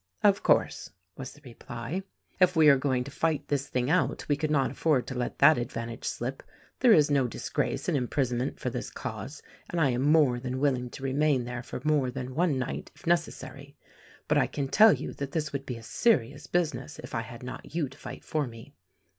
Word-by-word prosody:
"Of 200 Hz, -1 st, +5 dB
course," -, -, +2 dB, 0.3 s
was 130 Hz, 0 st, -7 dB
the 145 Hz, -, -18 dB
reply. 120 Hz, +6 st, -6 dB, 0.4 s
"If 180 Hz, -1 st, +4 dB
we 155 Hz, -2 st, +7 dB
are 140 Hz, -, +8 dB
going 130 Hz, -2 st, 0 dB
to 140 Hz, -, -9 dB
fight 160 Hz, +1 st, -1 dB
this 140 Hz, -1 st, 0 dB
thing 125 Hz, -1 st, -1 dB
out, 180 Hz, -, +1 dB
we 145 Hz, -, +2 dB
could 155 Hz, +1 st, -2 dB
not 140 Hz, -3 st, +2 dB
afford 150 Hz, -6 st, +1 dB
to -, -, -5 dB
let 125 Hz, -1 st, -3 dB
that 145 Hz, 0 st, +6 dB
advantage 115 Hz, -1 st, -5 dB
slip. 130 Hz, +3 st, -3 dB, 0.4 s
There 250 Hz, -2 st, +6 dB
is 150 Hz, -7 st, +5 dB
no 135 Hz, -3 st, +3 dB
disgrace -, -, -2 dB
in -, -, +1 dB
imprisonment 125 Hz, -1 st, -1 dB
for -, -, -2 dB
this -, -, -4 dB
cause, -, -, -7 dB, 0.3 s
and 175 Hz, -, -2 dB
I 140 Hz, -5 st, +3 dB
am 125 Hz, +1 st, -1 dB
more 145 Hz, -4 st, +4 dB
than 130 Hz, +1 st, -4 dB
willing 130 Hz, -3 st, +1 dB
to 135 Hz, -, -10 dB
remain 135 Hz, -1 st, +2 dB
there 120 Hz, 0 st, -5 dB, 0.2 s
more 150 Hz, -4 st, +2 dB
than 130 Hz, 0 st, -5 dB
one 160 Hz, -1 st, +1 dB
night, 130 Hz, -, -4 dB
if -, -, -18 dB
necessary; 155 Hz, -4 st, -2 dB, 0.5 s
but -, -, +3 dB
I -, -, +2 dB
can 140 Hz, -2 st, -3 dB
tell 220 Hz, +6 st, +7 dB
you -, -, -4 dB
that 140 Hz, 0 st, -6 dB
this 155 Hz, -3 st, -2 dB
would 140 Hz, -1 st, -4 dB
be 125 Hz, -, -4 dB
a 115 Hz, -, -11 dB
serious 140 Hz, -, +1 dB
business 165 Hz, -3 st, -1 dB
if -, -, -10 dB
I -, -, 0 dB
had 120 Hz, +1 st, -10 dB
not 130 Hz, +4 st, -8 dB
you 160 Hz, -4 st, +1 dB
to 130 Hz, -, -14 dB
fight -, -, -9 dB
for 150 Hz, -3 st, -1 dB
me. 120 Hz, +4 st, -12 dB
140 Hz, 215 wpm, -28 LUFS, 125-155 Hz, 0.5 s, are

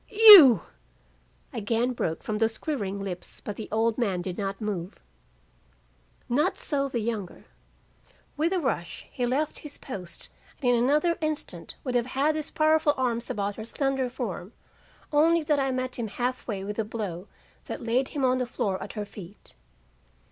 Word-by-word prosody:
"'You 405 Hz, -, +10 dB, 0.4 s
' -, -, -36 dB, 0.3 s
again 230 Hz, +4 st, 0 dB
broke 160 Hz, -9 st, -3 dB
from 210 Hz, -1 st, -2 dB
those 225 Hz, 0 st, +1 dB
quivering 200 Hz, -10 st, -3 dB
lips, 180 Hz, -2 st, -6 dB
but 210 Hz, -, -6 dB
the 220 Hz, -, -7 dB
old 225 Hz, +2 st, +1 dB
man 190 Hz, -7 st, 0 dB
did 185 Hz, -1 st, -4 dB
not 195 Hz, 0 st, -3 dB
move. 195 Hz, -4 st, -4 dB, 1.3 s
"Not 295 Hz, +9 st, +1 dB
so 275 Hz, -2 st, -1 dB
the 255 Hz, -, -2 dB
younger. 215 Hz, -5 st, -4 dB, 0.9 s
With 320 Hz, +4 st, +1 dB
a 375 Hz, -, +1 dB
rush 215 Hz, -, -3 dB
he 245 Hz, -1 st, -1 dB
left 285 Hz, +5 st, -1 dB
his 295 Hz, -2 st, -10 dB
post 180 Hz, -, -7 dB, 0.3 s
and 245 Hz, -3 st, +2 dB
in -, -, +4 dB
another 300 Hz, +6 st, +2 dB
instant 310 Hz, -1 st, -3 dB
would 255 Hz, -, -3 dB
have 245 Hz, -1 st, +1 dB
had 295 Hz, +3 st, +3 dB
his 305 Hz, -1 st, -4 dB
powerful 310 Hz, -1 st, +3 dB
arms 240 Hz, -2 st, -1 dB
about 200 Hz, 0 st, -2 dB
her 220 Hz, -, -6 dB
slender 270 Hz, +1 st, -1 dB
form, 225 Hz, -6 st, -5 dB, 0.6 s
only 325 Hz, +2 st, +4 dB
that 295 Hz, -1 st, +1 dB
I 270 Hz, -1 st, +1 dB
met 255 Hz, -1 st, -3 dB
him 230 Hz, -, -2 dB
half 250 Hz, +4 st, -3 dB
way 200 Hz, -4 st, -3 dB
with 210 Hz, +2 st, -5 dB
a -, -, +2 dB
blow 205 Hz, -4 st, -5 dB, 0.4 s
that -, -, -6 dB
laid 245 Hz, +3 st, +1 dB
him 280 Hz, -3 st, -1 dB
on 255 Hz, 0 st, +2 dB
the 250 Hz, -, -1 dB
floor 195 Hz, -5 st, -2 dB
at -, -, -7 dB
her 210 Hz, -2 st, -4 dB
feet. 200 Hz, -1 st, -12 dB
240 Hz, 175 wpm, -27 LUFS, 205-285 Hz, 1.3 s, You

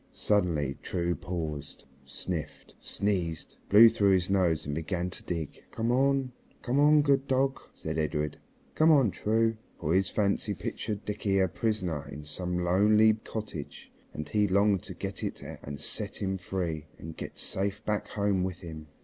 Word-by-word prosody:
Suddenly 80 Hz, -9 st, +1 dB
True 85 Hz, 0 st, -1 dB
paused, 80 Hz, -3 st, -5 dB, 0.2 s
sniffed, 75 Hz, +2 st, -5 dB
sneezed, 90 Hz, -6 st, -2 dB
blew 110 Hz, +3 st, +10 dB
through 100 Hz, -3 st, +3 dB
his 90 Hz, 0 st, +1 dB
nose 90 Hz, -5 st, +2 dB
and 75 Hz, -, -3 dB
began 85 Hz, +3 st, -2 dB
to -, -, -7 dB
dig. 85 Hz, -4 st, -4 dB
"Come 115 Hz, +1 st, -1 dB
on, 135 Hz, 0 st, +2 dB, 0.3 s
come 130 Hz, +3 st, +1 dB
on, 150 Hz, 0 st, +6 dB
good 140 Hz, -1 st, +2 dB
dog," 135 Hz, 0 st, +1 dB
said 80 Hz, 0 st, -4 dB
Edred, 75 Hz, -1 st, -1 dB, 0.3 s
"come 155 Hz, +1 st, +4 dB
on, 135 Hz, -9 st, +5 dB
True," 115 Hz, +3 st, +1 dB, 0.2 s
for 75 Hz, -, 0 dB
his 95 Hz, 0 st, +3 dB
fancy 100 Hz, -2 st, 0 dB
pictured 105 Hz, -2 st, -4 dB
Dickie 100 Hz, -1 st, 0 dB
a 95 Hz, -1 st, +4 dB
prisoner 90 Hz, -7 st, -2 dB
in 75 Hz, +1 st, -8 dB
some 90 Hz, +4 st, -2 dB
lonely 105 Hz, +5 st, +5 dB
cottage, 105 Hz, -8 st, -7 dB, 0.2 s
and 75 Hz, -1 st, -6 dB
he 105 Hz, +6 st, +2 dB
longed 100 Hz, 0 st, +3 dB
to -, -, -7 dB
get -, -, -5 dB
to -, -, -2 dB
it -, -, -8 dB, 0.2 s
and 70 Hz, -1 st, -7 dB
set -, -, -4 dB
him 95 Hz, -1 st, -1 dB
free 85 Hz, -4 st, -3 dB
and 80 Hz, 0 st, -8 dB
get -, -, -7 dB
safe 100 Hz, +2 st, -1 dB
back 105 Hz, -1 st, -1 dB
home 100 Hz, -3 st, 0 dB
with 95 Hz, -1 st, -4 dB
him. 80 Hz, -3 st, -8 dB
95 Hz, 165 wpm, -29 LUFS, 80-105 Hz, 0.3 s, blew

